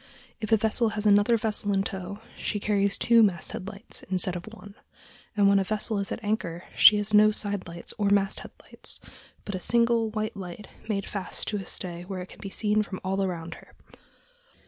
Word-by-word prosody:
If 215 Hz, -, -4 dB
a 220 Hz, -, +7 dB
vessel 220 Hz, +2 st, +1 dB
has 210 Hz, -, -1 dB
another 205 Hz, +3 st, +5 dB
vessel 210 Hz, -2 st, -1 dB
in 195 Hz, 0 st, +2 dB
tow, 195 Hz, +2 st, -6 dB
she 210 Hz, -, -2 dB
carries 200 Hz, -1 st, +1 dB
two 235 Hz, -1 st, +5 dB
masthead 190 Hz, -2 st, 0 dB
lights 210 Hz, +1 st, -9 dB
instead 185 Hz, -1 st, +1 dB
of 175 Hz, +2 st, -6 dB
one; 205 Hz, -2 st, -12 dB, 0.6 s
and 200 Hz, -1 st, +5 dB
when 200 Hz, 0 st, +5 dB
a -, -, +2 dB
vessel 215 Hz, +1 st, -1 dB
is 200 Hz, -, -3 dB
at 230 Hz, -, -4 dB
anchor 180 Hz, -5 st, -2 dB
she 210 Hz, -, +8 dB
has 205 Hz, +1 st, -2 dB
no 210 Hz, 0 st, +7 dB
side 205 Hz, -2 st, -3 dB
lights 170 Hz, 0 st, -8 dB
or 205 Hz, -1 st, +2 dB
masthead 200 Hz, -1 st, +1 dB
light, -, -, -6 dB, 0.5 s
but 200 Hz, -, -4 dB
a 185 Hz, -, -2 dB
single 235 Hz, +2 st, +2 dB
white 215 Hz, 0 st, -3 dB
light 190 Hz, +1 st, -8 dB, 0.2 s
made 200 Hz, -2 st, -1 dB
fast 200 Hz, -2 st, -4 dB
to 210 Hz, -, -1 dB
a 195 Hz, -, -6 dB
stay 175 Hz, -2 st, -5 dB
where 185 Hz, -1 st, -5 dB
it 180 Hz, -, -13 dB
can -, -, -14 dB
be 195 Hz, -, -6 dB
seen 210 Hz, +1 st, +1 dB
from 200 Hz, -3 st, -5 dB
all 195 Hz, +1 st, 0 dB
around 170 Hz, -3 st, -3 dB
her. -, -, -20 dB
200 Hz, 205 wpm, -27 LUFS, 190-215 Hz, 0.6 s, she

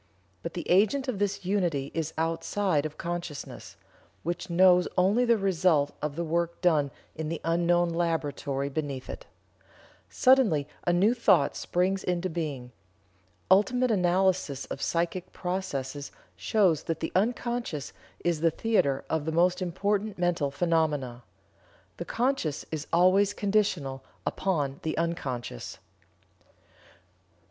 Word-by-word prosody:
But -, -, -6 dB
the 175 Hz, -, -5 dB
agent 215 Hz, +9 st, +3 dB
of 235 Hz, -6 st, -2 dB
this 200 Hz, -2 st, -1 dB
unity 175 Hz, -8 st, 0 dB
is 160 Hz, -1 st, -2 dB
outside 165 Hz, 0 st, 0 dB
of 155 Hz, -, -15 dB
consciousness, 170 Hz, -4 st, -6 dB, 0.5 s
which 175 Hz, +2 st, -3 dB
knows 180 Hz, 0 st, +5 dB
only 200 Hz, +7 st, +3 dB
the 235 Hz, -1 st, +4 dB
result 175 Hz, -7 st, +2 dB
of 150 Hz, -1 st, -3 dB
the 170 Hz, -, -2 dB
work 170 Hz, +1 st, -1 dB
done 155 Hz, -6 st, +3 dB, 0.3 s
in 160 Hz, -1 st, -4 dB
the 165 Hz, -, -3 dB
unknown 175 Hz, +1 st, +2 dB
laboratory 145 Hz, -5 st, -1 dB
beneath 140 Hz, -2 st, -4 dB
it. -, -, -10 dB, 0.8 s
Suddenly 230 Hz, -, +4 dB, 0.2 s
a -, -, +5 dB
new 195 Hz, +7 st, +4 dB
thought 190 Hz, -, +3 dB
springs 185 Hz, +2 st, 0 dB
into 180 Hz, 0 st, -1 dB
being. 145 Hz, -7 st, -4 dB, 0.8 s
Ultimate 245 Hz, +6 st, +4 dB
analysis 180 Hz, -6 st, +1 dB
of -, -, -7 dB
psychic 175 Hz, +2 st, -1 dB
processes 145 Hz, -7 st, -4 dB, 0.2 s
shows 190 Hz, -8 st, +2 dB
that 165 Hz, -1 st, -2 dB
the 160 Hz, -, -3 dB
unconscious 235 Hz, -, -1 dB, 0.3 s
is 170 Hz, -3 st, +1 dB
the 165 Hz, -, +4 dB
theater 160 Hz, -7 st, 0 dB
of 160 Hz, -2 st, -1 dB
the 160 Hz, -, -1 dB
most 175 Hz, +3 st, +2 dB
important 200 Hz, +4 st, -1 dB
mental 175 Hz, -5 st, +1 dB
phenomena. 145 Hz, -5 st, 0 dB, 0.8 s
The -, -, -5 dB
conscious 235 Hz, -, -1 dB
is 155 Hz, -2 st, -4 dB
always 190 Hz, +4 st, +4 dB
conditional 190 Hz, -10 st, 0 dB, 0.2 s
upon 145 Hz, -8 st, -1 dB
the 155 Hz, -1 st, -3 dB
unconscious." 130 Hz, -, -3 dB
170 Hz, 125 wpm, -28 LUFS, 150-190 Hz, 0.8 s, knows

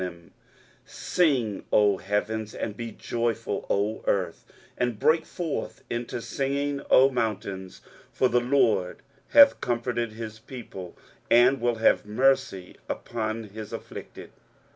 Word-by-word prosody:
23:049:013 85 Hz, -2 st, -7 dB, 0.6 s
Sing, 130 Hz, -, 0 dB
O 105 Hz, -2 st, +4 dB
heavens; 105 Hz, +3 st, -2 dB
and 105 Hz, -, -4 dB
be 115 Hz, +1 st, -6 dB
joyful, 115 Hz, -1 st, -3 dB
O 105 Hz, +2 st, 0 dB
earth; 95 Hz, -4 st, -1 dB, 0.3 s
and 125 Hz, -3 st, -1 dB
break 160 Hz, +8 st, +2 dB
forth 165 Hz, -4 st, -4 dB
into 120 Hz, 0 st, -3 dB
singing, 140 Hz, +3 st, -2 dB
O 135 Hz, +1 st, +6 dB
mountains: 100 Hz, -6 st, -3 dB, 0.3 s
for 130 Hz, -, +2 dB
the 125 Hz, 0 st, +2 dB
LORD 120 Hz, -8 st, +1 dB, 0.3 s
hath 285 Hz, -1 st, +7 dB
comforted 120 Hz, -1 st, -1 dB
his 110 Hz, -1 st, -7 dB
people, 110 Hz, -7 st, -9 dB, 0.3 s
and 125 Hz, +3 st, +5 dB
will 120 Hz, 0 st, +1 dB
have 115 Hz, -, +3 dB
mercy 130 Hz, -4 st, +1 dB
upon 115 Hz, -1 st, -3 dB
his 105 Hz, 0 st, -9 dB
afflicted. -, -, -9 dB
115 Hz, 120 wpm, -26 LUFS, 105-130 Hz, 0.6 s, hath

